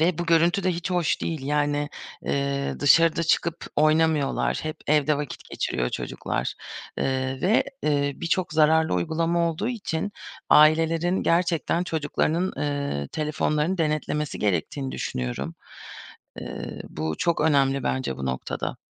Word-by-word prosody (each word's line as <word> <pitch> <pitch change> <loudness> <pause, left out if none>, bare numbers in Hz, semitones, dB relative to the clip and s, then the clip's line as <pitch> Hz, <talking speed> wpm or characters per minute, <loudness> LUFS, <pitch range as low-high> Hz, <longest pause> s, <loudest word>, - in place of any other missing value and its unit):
Ve 170 +1 +2
bu 175 - -2
görüntü 170 +3 +3
de 185 - +2
hiç 175 +2 -4
hoş 175 -3 +1
değil. 160 -4 -3
Yani, 145 0 0 0.3
eee, 140 0 -1
dışarı 160 +3 +5
da 165 - +1
çıkıp 170 +1 0
oynamıyorlar. 155 -1 +2
Hep 155 0 -4
evde 150 0 +3
vakit 145 -2 -6
geçiriyor 60 - -1
çocuklar. - - -3 0.4
Eee, 130 0 -1
ve, 205 +6 +3 0.2
eee, 145 -1 +1
birçok 170 +1 -1
zararlı 160 -3 +4
uygulama 165 - +1
olduğu 165 +8 -3
için 205 -5 -3 0.4
ailelerin 165 +4 +4
gerçekten 170 0 +1
çocuklarının, 160 +2 0
eee, 140 - -2
telefonlarını 155 +3 0
denetlemesi 150 -1 -1
gerektiğini 105 - -1
düşünüyorum. 65 +5 -3 0.9
Eee, - - -6
bu 80 0 -3
çok 170 -1 +1
önemli 140 -3 +3
bence 130 -1 -1
bu 65 - -4
noktada. 65 0 -3
155 Hz, 130 wpm, -25 LUFS, 140-165 Hz, 0.9 s, dışarı